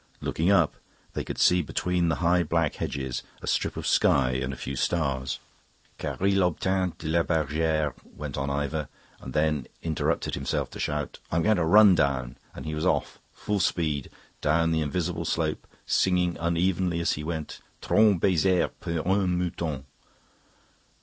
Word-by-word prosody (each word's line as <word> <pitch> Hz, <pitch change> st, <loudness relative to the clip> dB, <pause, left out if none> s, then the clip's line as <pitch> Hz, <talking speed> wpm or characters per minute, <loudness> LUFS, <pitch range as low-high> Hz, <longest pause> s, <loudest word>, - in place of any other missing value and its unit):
Looking 85 Hz, +4 st, 0 dB
up, 85 Hz, -6 st, +3 dB, 0.4 s
they -, -, -2 dB
could -, -, -6 dB
see 90 Hz, 0 st, +4 dB
between 90 Hz, +2 st, 0 dB
the 85 Hz, -, +1 dB
high 90 Hz, +1 st, +4 dB
black 85 Hz, -1 st, 0 dB
hedges 65 Hz, -3 st, -3 dB, 0.2 s
a -, -, -9 dB
strip -, -, 0 dB
of -, -, -4 dB
sky 65 Hz, -2 st, +3 dB
and 65 Hz, +1 st, -2 dB
a -, -, -5 dB
few 65 Hz, +2 st, -5 dB
stars. 70 Hz, -3 st, -1 dB, 0.6 s
"Car -, -, -4 dB
il 100 Hz, 0 st, +3 dB
obtint 90 Hz, +1 st, 0 dB
de 80 Hz, -, -7 dB
la 85 Hz, +2 st, +3 dB
bergere..." 80 Hz, -2 st, 0 dB, 0.2 s
Went -, -, -5 dB
on 70 Hz, +1 st, -2 dB
Ivor, 70 Hz, +2 st, -2 dB, 0.3 s
and 65 Hz, -, -8 dB
then 75 Hz, 0 st, +1 dB, 0.2 s
interrupted 80 Hz, -2 st, -1 dB
himself 70 Hz, -, -2 dB
to -, -, -9 dB
shout, 75 Hz, -2 st, -3 dB
"I'm 80 Hz, +1 st, +1 dB
going 110 Hz, -1 st, +3 dB
to 85 Hz, -, +1 dB
run 105 Hz, +3 st, +7 dB
down," 70 Hz, -6 st, 0 dB, 0.2 s
and -, -, -8 dB
he 75 Hz, -, -3 dB
was 75 Hz, -, -3 dB
off, -, -, 0 dB
full 105 Hz, -1 st, -2 dB
speed, 80 Hz, -6 st, 0 dB, 0.3 s
down 80 Hz, +2 st, +2 dB
the 80 Hz, -1 st, +1 dB
invisible 85 Hz, +3 st, -2 dB
slope, 80 Hz, -1 st, -1 dB, 0.2 s
singing 90 Hz, -2 st, +2 dB
unevenly 85 Hz, +1 st, +1 dB
as 85 Hz, -, +1 dB
he 75 Hz, -, -3 dB
went: 80 Hz, -1 st, -5 dB, 0.2 s
"Trente 105 Hz, -4 st, +4 dB
baisers 95 Hz, 0 st, +2 dB
pour 85 Hz, 0 st, -3 dB
un 95 Hz, -2 st, +2 dB
mouton." 85 Hz, -6 st, -3 dB
80 Hz, 165 wpm, -27 LUFS, 75-90 Hz, 0.6 s, run